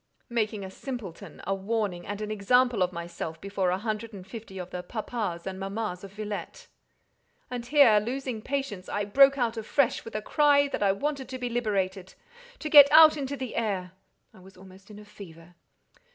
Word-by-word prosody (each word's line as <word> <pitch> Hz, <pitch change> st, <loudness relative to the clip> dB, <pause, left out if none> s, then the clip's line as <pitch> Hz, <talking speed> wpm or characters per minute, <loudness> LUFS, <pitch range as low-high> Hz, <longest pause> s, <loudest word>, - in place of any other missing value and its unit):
"Making 215 Hz, -3 st, -1 dB
a 190 Hz, -, -8 dB
simpleton, 225 Hz, -6 st, -8 dB
a 195 Hz, -, 0 dB
warning, 195 Hz, -2 st, -2 dB
and 205 Hz, +1 st, -5 dB
an 215 Hz, 0 st, -4 dB
example 245 Hz, +2 st, +2 dB
of 180 Hz, 0 st, +2 dB
myself, 170 Hz, -2 st, -6 dB
before 195 Hz, -1 st, -1 dB
a 180 Hz, -, +1 dB
hundred 215 Hz, +2 st, -4 dB
and 190 Hz, -2 st, -9 dB
fifty 215 Hz, -2 st, -10 dB
of 180 Hz, -1 st, -7 dB
the 180 Hz, -, -4 dB
'papas' 210 Hz, -3 st, -4 dB
and 190 Hz, 0 st, -5 dB
'mammas' 195 Hz, -1 st, -4 dB
of 195 Hz, -, -9 dB
Villette." 215 Hz, -, -6 dB, 0.9 s
And 240 Hz, -1 st, -5 dB
here, 265 Hz, -7 st, +6 dB
losing 245 Hz, +1 st, -4 dB
patience, 265 Hz, -8 st, -4 dB
I 205 Hz, 0 st, -2 dB
broke 275 Hz, +6 st, +5 dB
out 235 Hz, -3 st, -1 dB
afresh 235 Hz, +4 st, 0 dB
with 225 Hz, -, -10 dB
a 215 Hz, -, -1 dB
cry 290 Hz, 0 st, +4 dB
that -, -, -4 dB
I 200 Hz, -1 st, +4 dB
wanted 270 Hz, +5 st, -3 dB
to 260 Hz, -, -5 dB
be 250 Hz, -1 st, -3 dB
liberated—to 225 Hz, -, -4 dB
get 285 Hz, -2 st, +9 dB
out 310 Hz, 0 st, +9 dB
into 280 Hz, -1 st, -4 dB
the 260 Hz, -3 st, -6 dB
air—I 190 Hz, -4 st, -5 dB
was 190 Hz, +2 st, -17 dB
almost 190 Hz, +1 st, -16 dB
in 210 Hz, -, -11 dB
a 210 Hz, -, -12 dB
fever. 175 Hz, -5 st, -13 dB
215 Hz, 180 wpm, -27 LUFS, 190-250 Hz, 0.9 s, get